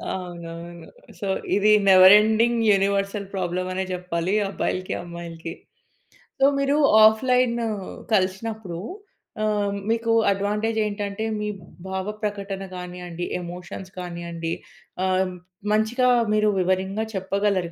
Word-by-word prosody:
అవునవును. 170 -1 -8 0.3
సో, 200 - -4 0.3
ఇది 210 +1 +4 0.2
never 185 +1 +9
ending 225 +2 +2
universal 200 0 +1
problem 185 -1 -2
అనే 190 - -1
జెప్పాలి 180 0 -2 0.2
అబ్బాయిలకి, 185 -1 -2
అమ్మాయిలకి. 170 -1 -7 0.9
సో, 270 - +5
మీరు 280 +2 +2 0.3
ఆఫ్‌లైనూ 235 +1 +3 0.5
కలిసినప్పుడు 190 -1 -2 0.6
ఆహ్, 205 -1 0 0.2
మీకు 230 0 0 0.2
అడ్వాంటేజ్ 210 +3 -1
ఏంటంటే, 205 +1 -3
మీ 210 - -2 0.4
భావ 190 0 -3 0.2
ప్రకటన 200 -2 -3
కానియండి, 180 -1 -6 0.2
ఎమోషన్స్ 180 +2 -8
కానియండి, 170 -2 -5 0.5
ఆహ్, 185 0 +1 0.4
మంచిగా 235 +4 +2 0.2
మీరు 215 0 +3
వివరంగా 190 +4 0
చెప్పగలరు 190 -2 0
195 Hz, 100 wpm, -24 LUFS, 180-215 Hz, 0.9 s, never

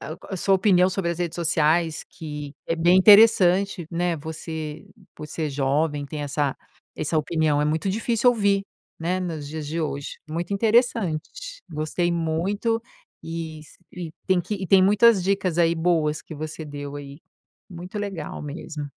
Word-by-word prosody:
ah, 155 - -7
a 190 - -4
sua 195 +2 +2
opinião 185 -2 +4
sobre 185 -3 -1
as 170 - -4
redes 175 -2 -2
sociais 165 -1 +1
que 150 -2 -7
é 165 - 0
bem 175 +2 +4
interessante, 195 -3 +6
né, 175 0 0
você, 160 0 -6 0.3
por 150 - -8
ser 155 0 -3
jovem, 145 +2 0
tem 150 +1 -5
essa 145 -1 -1 0.4
essa 155 +1 0
opinião, 155 -1 +1
é - - +2
muito 160 +5 0
difícil 230 +4 +2
ouvir, 200 -4 +2 0.4
né, 175 +3 -1
nos 160 -6 -4
dias 155 0 -5
de 160 +3 -3
hoje, 145 -3 -4
muito 170 +5 -3
interessante, 215 -6 +1 0.4
gostei 155 +3 -1
muito 180 +8 -1 0.5
e 165 -1 -5
s 150 - -17
e 175 -3 -7
tem 185 -2 +3
que 210 - -4
e 190 -2 -4
tem 190 +1 +6
muitas 205 +1 +5
dicas 190 -3 0
aí 170 -1 +4
boas 160 -2 +1
que 160 - -10
você 155 +1 -6
deu 145 -1 -7
aí, 140 +1 -9 0.5
muito 180 +3 -7
legal 195 -7 -5
mesmo. 150 0 -6
165 Hz, 165 wpm, -24 LUFS, 155-190 Hz, 0.5 s, interessante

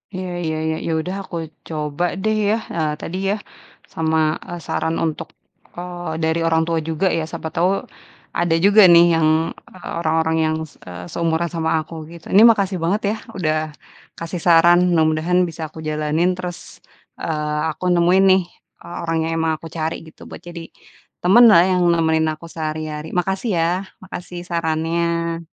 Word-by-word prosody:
Iya 185 0 -4 0.2
iya 160 -1 -1
iya, 160 0 0
ya - - 0
udah, 180 +4 -4
aku 175 - -9 0.3
coba 150 0 -3 0.2
deh 215 0 +1
ya, 215 - +3 0.2
eee, 155 -2 0
tadi 180 - -5
ya. 205 - +2 0.6
Sama, 160 0 0 0.3
eee, 175 - -5
saran 160 0 -1
untuk, 160 -2 -3 0.5
eee, 175 -2 -5
dari 160 +1 +1
orang 160 0 +3
tua 165 0 0
juga 160 +4 -1
ya, 160 - -1
siapa 160 - -5
tau 175 +2 +3 0.7
ada 175 -1 +2
juga 205 +2 +7
nih, 170 0 +8
yang, 165 -1 +3 0.4
eee 185 - -11
orang-orang 160 0 +1
yang, 155 0 0 0.2
se - - -23
eee, 90 0 -8
seumuran 170 0 0
sama 160 -1 -1 0.2
aku, - - -12 0.2
gitu. 170 -1 -12
Ini, 200 - +7
makasih 200 -4 +1
banget 195 +6 +1
ya, - - -3 0.2
udah 155 -4 0 0.6
kasih 170 +1 -5
saran, 175 0 +6
mudah-mudahan 160 +1 +2
bisa 165 0 -9
aku 155 - -16
jalanin. 155 +3 +1
Terus, 180 -1 -5 0.6
eee, 150 -1 -2
aku 155 - -7
nemuin 175 +2 +4
nih, 190 - +3 0.4
eee, 175 - -9
orang 165 0 0
yang 165 - -2
emang 160 0 +1
aku 165 - -8
cari, 160 0 -1
gitu, 160 - -17
buat - - -10
jadi 170 -1 -9 0.6
temanlah, 200 -1 +7
yang 180 -1 +2
nemenin 160 -1 +2
aku 155 +2 -12
sehari-hari. 155 -1 -4
Makasih 190 +5 -1
ya, 165 0 +2 0.3
makasih 180 -1 -8
sarannya. 170 0 -1
165 Hz, 165 wpm, -20 LUFS, 160-175 Hz, 0.7 s, nih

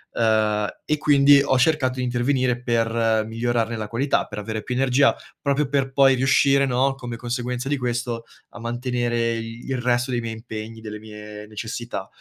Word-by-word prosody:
Ehm, 110 -2 +2 0.2
e 150 - +1
quindi 140 -1 +6
ho 130 - +2
cercato 130 -1 +2
di 130 - -1
intervenire 125 0 0
per 115 -2 +1
migliorarne 115 +1 -1
la 105 -1 -4
qualità, 130 +6 0
per 105 - -8
avere 110 +1 -4
più 125 +4 -4
energia, 135 +2 +3 0.3
proprio 140 0 +1
per 135 -1 0
poi 135 0 +5
riuscire, 135 +1 +3
no, 135 +2 +2
come 125 -3 -6
conseguenza 125 +1 -3
di 145 - +1
questo, 120 -2 -3 0.2
a - - -12
mantenere 120 0 -1
il 115 +3 -5
resto 120 +1 +1
dei 120 -1 0
miei 115 -1 -4
impegni, 110 0 -8
delle 105 -1 -7
mie 105 -1 -10
necessità. 110 -1 -5
120 Hz, 165 wpm, -23 LUFS, 115-130 Hz, 0.3 s, quindi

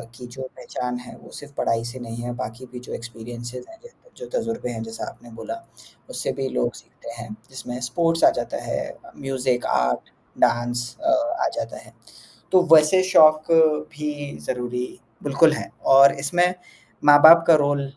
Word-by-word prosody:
की 125 - -10
जो 125 +2 -10 0.2
पहचान 125 0 -5
है 125 - -11
वो - - -16
सिर्फ़ 145 0 -11
पढ़ाई 115 0 0
से 125 +2 -7
नहीं 115 -1 -7
है, 120 0 -4
बाकी 120 +1 -7
भी 125 - -8
जो 125 - -10
एक्सपीरियंसेस 120 +1 -8
हैं, 335 0 -15 0.4
जो 485 - -8
तजुर्बे 230 - -3
हैं, 115 - -5
जैसा 115 0 -6
आपने 120 - -16
बोला 115 - -6 0.5
उससे - - -3
भी 135 - -1
लोग - - -1
सीखते - - -13
हैं, 115 - -9 0.2
जिसमें 125 -2 -7
स्पोर्ट्स 165 +7 0
आ - - +9
जाता - - -4
है, - - -2 0.4
म्यूज़िक, 130 -2 -1
आर्ट, 60 0 0 0.3
डाँस 120 0 +1 0.2
अ, 330 +1 +1 0.3
आ - - +2
जाता - - -5
है, - - -15 0.6
तो 185 -1 +5
वैसे 155 +4 +6
शौक 155 -4 +6 0.5
भी 150 - -5
ज़रूरी 125 0 -3 0.4
बिल्कुल 155 +2 +4
हैं - - -6 0.2
और 140 +1 +8
इसमें 175 +4 +2 0.5
माँ-बाप 160 +3 +9
का 165 - +8
रोल 145 -1 0
130 Hz, 165 wpm, -23 LUFS, 120-155 Hz, 0.6 s, आ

